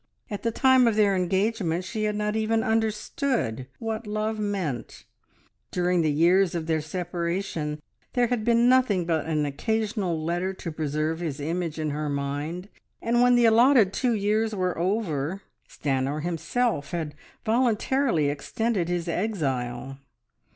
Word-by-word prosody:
At 205 Hz, -, -4 dB
the 230 Hz, -, 0 dB
time 260 Hz, +1 st, +4 dB
of 225 Hz, -, +2 dB
their 205 Hz, -2 st, +4 dB
engagement 190 Hz, -1 st, 0 dB
she 215 Hz, +2 st, -2 dB
had 210 Hz, 0 st, 0 dB
not 210 Hz, 0 st, -1 dB
even 220 Hz, 0 st, +1 dB
understood 220 Hz, -, -1 dB
what 225 Hz, -1 st, -4 dB
love 215 Hz, +1 st, -2 dB
meant; 190 Hz, -, -3 dB, 0.6 s
during 180 Hz, 0 st, +1 dB
the 155 Hz, -2 st, +2 dB
years 175 Hz, +4 st, +3 dB
of 165 Hz, -2 st, -2 dB
their 160 Hz, -1 st, 0 dB
separation 170 Hz, -1 st, -3 dB, 0.3 s
there 245 Hz, -1 st, +3 dB
had 235 Hz, -2 st, -1 dB
been 235 Hz, +1 st, +4 dB
nothing 250 Hz, -8 st, +3 dB
but 160 Hz, -2 st, 0 dB
an 155 Hz, -2 st, +1 dB
occasional 205 Hz, +3 st, -1 dB
letter 175 Hz, +4 st, -2 dB
to 170 Hz, -, -6 dB
preserve 155 Hz, +1 st, -2 dB
his 155 Hz, -5 st, -4 dB
image 165 Hz, +2 st, -2 dB
in 155 Hz, -1 st, -1 dB
her 150 Hz, +1 st, -2 dB
mind, 145 Hz, +6 st, -3 dB, 0.3 s
and 240 Hz, +1 st, +1 dB
when 245 Hz, 0 st, +5 dB
the 240 Hz, -1 st, +5 dB
allotted 230 Hz, -2 st, +5 dB
two 250 Hz, -2 st, +1 dB
years 215 Hz, +1 st, +1 dB
were 185 Hz, -2 st, 0 dB
over, 180 Hz, -2 st, -1 dB, 0.3 s
Stanor 140 Hz, +1 st, -1 dB
himself 170 Hz, -, -1 dB
had 160 Hz, -4 st, -3 dB, 0.3 s
voluntarily 235 Hz, -, +2 dB
extended 185 Hz, +5 st, -1 dB
his 175 Hz, -1 st, -1 dB
exile. 135 Hz, -, -2 dB
185 Hz, 145 wpm, -26 LUFS, 155-220 Hz, 0.6 s, when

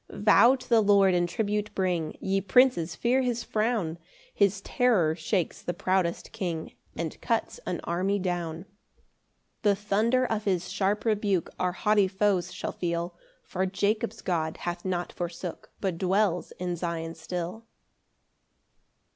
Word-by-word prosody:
9 -, -, -9 dB
[Vow 235 Hz, +4 st, +7 dB
to 255 Hz, -1 st, -11 dB
the 230 Hz, -3 st, +5 dB
Lord, 200 Hz, -2 st, +5 dB
and 175 Hz, 0 st, +1 dB
tribute 210 Hz, +2 st, -1 dB
bring, 180 Hz, -4 st, -1 dB
Ye 195 Hz, 0 st, 0 dB
princes, 195 Hz, -5 st, +3 dB
fear 250 Hz, +6 st, +2 dB
his 245 Hz, -2 st, -1 dB
frown: 215 Hz, -7 st, -1 dB, 0.3 s
His 200 Hz, -1 st, +2 dB
terror 205 Hz, -13 st, +2 dB
shakes 175 Hz, +2 st, -1 dB
the 175 Hz, -, -3 dB
proudest 185 Hz, -1 st, 0 dB
king, 175 Hz, -7 st, -4 dB, 0.2 s
And -, -, -4 dB
cuts -, -, -1 dB
an -, -, -2 dB
army 185 Hz, +4 st, 0 dB
down. 175 Hz, -3 st, -3 dB
10 -, -, -25 dB, 1.0 s
The 205 Hz, -2 st, +4 dB
thunder 215 Hz, +5 st, +1 dB
of 220 Hz, -4 st, -2 dB
his 185 Hz, -3 st, 0 dB
sharp 200 Hz, +2 st, 0 dB
rebuke 205 Hz, -5 st, +1 dB
Our 180 Hz, -1 st, +1 dB
haughty 210 Hz, 0 st, +3 dB
foes 190 Hz, -2 st, +1 dB
shall -, -, -4 dB
feel: 170 Hz, 0 st, -3 dB, 0.3 s
For 190 Hz, +1 st, -2 dB
Jacob's 205 Hz, +3 st, -1 dB
God 160 Hz, -3 st, -1 dB
hath 175 Hz, 0 st, -3 dB
not 180 Hz, -1 st, -2 dB
forsook, 175 Hz, 0 st, -5 dB
But 185 Hz, -4 st, -2 dB
dwells 190 Hz, -1 st, +1 dB
in 180 Hz, -1 st, -3 dB
Sion 165 Hz, -1 st, -3 dB
still. 180 Hz, +7 st, -5 dB
190 Hz, 145 wpm, -28 LUFS, 175-210 Hz, 1.0 s, Vow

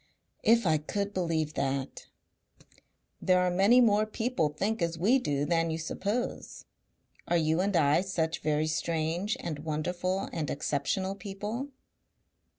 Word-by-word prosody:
"If 230 Hz, 0 st, +4 dB
I 155 Hz, -3 st, +3 dB
could 200 Hz, +6 st, -3 dB
believe 160 Hz, -4 st, -1 dB
that!" 135 Hz, 0 st, -3 dB, 1.1 s
"There 185 Hz, -1 st, +4 dB
are 180 Hz, 0 st, +2 dB
many 200 Hz, +7 st, +5 dB
more 215 Hz, -3 st, +4 dB
people 220 Hz, -7 st, 0 dB
think 200 Hz, +8 st, -2 dB
as 170 Hz, 0 st, -1 dB
we 220 Hz, +11 st, +3 dB
do 145 Hz, -, -1 dB
than 165 Hz, +1 st, +1 dB
you 160 Hz, -, -2 dB
suppose. 200 Hz, +8 st, -3 dB, 0.6 s
Are 175 Hz, -, +2 dB
you 160 Hz, +1 st, +2 dB
and 200 Hz, 0 st, 0 dB
I 150 Hz, +1 st, +4 dB
such 170 Hz, -4 st, -1 dB
very 155 Hz, 0 st, 0 dB
strange 165 Hz, +5 st, -1 dB
and 155 Hz, -4 st, -4 dB
wonderful 175 Hz, +5 st, -2 dB
and 155 Hz, -5 st, -2 dB
exceptional 150 Hz, +7 st, -1 dB
people?" 205 Hz, +6 st, -5 dB
175 Hz, 140 wpm, -29 LUFS, 155-200 Hz, 1.1 s, many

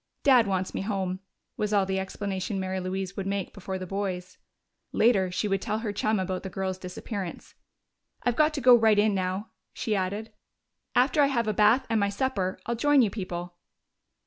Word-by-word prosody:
"Dad 250 Hz, -6 st, +6 dB
wants 190 Hz, -1 st, -1 dB
me -, -, -2 dB
home," 190 Hz, -2 st, -2 dB, 0.4 s
was 210 Hz, 0 st, -1 dB
all 200 Hz, -2 st, +4 dB
the 190 Hz, 0 st, -1 dB
explanation 190 Hz, 0 st, -3 dB
Mary 190 Hz, 0 st, -2 dB
Louise 190 Hz, +1 st, -3 dB
would 195 Hz, -1 st, -4 dB
make 195 Hz, -1 st, -2 dB
before 190 Hz, -1 st, -5 dB
the 185 Hz, -, -5 dB
boys. 185 Hz, -1 st, -4 dB, 0.5 s
Later, 200 Hz, -5 st, +3 dB
she 180 Hz, +4 st, -1 dB
would 195 Hz, -1 st, 0 dB
tell 215 Hz, -, -1 dB
her 220 Hz, -2 st, -3 dB
chum 215 Hz, +1 st, +1 dB
about 185 Hz, 0 st, -2 dB
the 190 Hz, -, -6 dB
girl's 190 Hz, 0 st, -3 dB
disappearance. 185 Hz, 0 st, -6 dB, 0.7 s
"I've 245 Hz, -1 st, +1 dB
got 305 Hz, +2 st, +4 dB
to 280 Hz, -, -2 dB
go 250 Hz, 0 st, +8 dB
right 220 Hz, -3 st, +5 dB
in 210 Hz, 0 st, +4 dB
now," 190 Hz, +2 st, -2 dB, 0.2 s
she 220 Hz, -4 st, -1 dB
added. 200 Hz, +3 st, -2 dB, 0.6 s
"After 275 Hz, +4 st, +4 dB
I 280 Hz, -, +5 dB
have 235 Hz, -5 st, 0 dB
a 215 Hz, -, +1 dB
bath 220 Hz, +6 st, +4 dB
and 225 Hz, -1 st, +1 dB
my 200 Hz, 0 st, +2 dB
supper, 200 Hz, -4 st, -1 dB
I'll 235 Hz, -, -1 dB
join 280 Hz, +3 st, +4 dB
you 210 Hz, -, +1 dB
people." 175 Hz, -3 st, -5 dB
200 Hz, 195 wpm, -27 LUFS, 190-220 Hz, 0.7 s, go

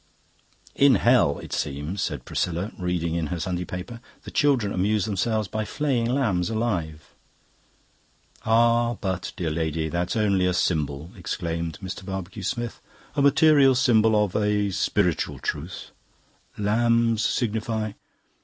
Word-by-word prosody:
"In 140 Hz, -1 st, +5 dB
hell, 120 Hz, -, +3 dB
it -, -, -8 dB
seems," 75 Hz, +7 st, -3 dB
said 70 Hz, -8 st, -3 dB
Priscilla, 90 Hz, +5 st, -2 dB
reading 90 Hz, -2 st, -1 dB
in 85 Hz, -2 st, -1 dB
her 85 Hz, +3 st, -4 dB
Sunday 90 Hz, +1 st, -2 dB
paper, 95 Hz, +8 st, -7 dB, 0.2 s
"the -, -, -9 dB
children 130 Hz, -8 st, +2 dB
amuse 100 Hz, +2 st, +1 dB
themselves 110 Hz, +1 st, -1 dB
by 110 Hz, +3 st, -3 dB
flaying 125 Hz, -1 st, -1 dB
lambs 110 Hz, -10 st, +1 dB
alive." 90 Hz, -10 st, -3 dB, 1.3 s
"Ah, 115 Hz, +1 st, +3 dB
but, 95 Hz, -2 st, -3 dB
dear 85 Hz, -3 st, -2 dB
lady, 80 Hz, 0 st, -1 dB
that's 85 Hz, +4 st, -2 dB
only 100 Hz, -4 st, +2 dB
a 90 Hz, -, 0 dB
symbol," 75 Hz, -2 st, -1 dB
exclaimed 85 Hz, -1 st, -4 dB
Mr. 95 Hz, +1 st, -6 dB
Barbecue 95 Hz, +1 st, -6 dB
Smith, 120 Hz, +3 st, -3 dB, 0.3 s
"a 145 Hz, -, +1 dB
material 140 Hz, -1 st, +5 dB
symbol 110 Hz, -4 st, +4 dB
of 95 Hz, -, -8 dB
a -, -, +3 dB
h 105 Hz, -1 st, +1 dB, 0.2 s
piritual -, -, 0 dB
truth. 80 Hz, +5 st, -5 dB, 0.7 s
Lambs 115 Hz, +1 st, +2 dB
signify..." 110 Hz, -2 st, -1 dB
100 Hz, 135 wpm, -25 LUFS, 85-115 Hz, 1.3 s, In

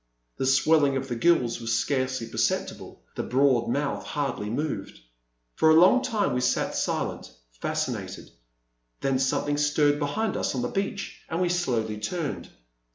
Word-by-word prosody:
The 130 Hz, -, -1 dB
swelling 140 Hz, +1 st, +4 dB
of 135 Hz, 0 st, -4 dB
the 120 Hz, -, -2 dB
gills 120 Hz, -5 st, +2 dB
was 115 Hz, -1 st, 0 dB
scarcely 130 Hz, -3 st, -1 dB
perceptible, 115 Hz, -, -2 dB
the -, -, -3 dB
broad 130 Hz, -2 st, +2 dB
mouth 140 Hz, -7 st, -1 dB
hardly 120 Hz, -1 st, -3 dB
moved. 125 Hz, -4 st, -3 dB, 0.5 s
For 160 Hz, -, +3 dB
a 160 Hz, -, +7 dB
long 185 Hz, +10 st, +6 dB
time 215 Hz, -, 0 dB
we 125 Hz, -, 0 dB
sat 125 Hz, -, 0 dB
silent, -, -, -2 dB, 0.3 s
fascinated; -, -, -3 dB, 0.7 s
then 135 Hz, -1 st, +1 dB
something 145 Hz, +2 st, 0 dB
stirred 145 Hz, 0 st, +2 dB
behind 200 Hz, +9 st, -1 dB
us -, -, -1 dB
on 125 Hz, -, -1 dB
the 120 Hz, -, -1 dB
beach 195 Hz, 0 st, -4 dB
and 165 Hz, -, -2 dB
we 180 Hz, -1 st, +1 dB
slowly 120 Hz, -12 st, -1 dB
turned. 135 Hz, -, -4 dB
140 Hz, 155 wpm, -26 LUFS, 120-160 Hz, 0.7 s, a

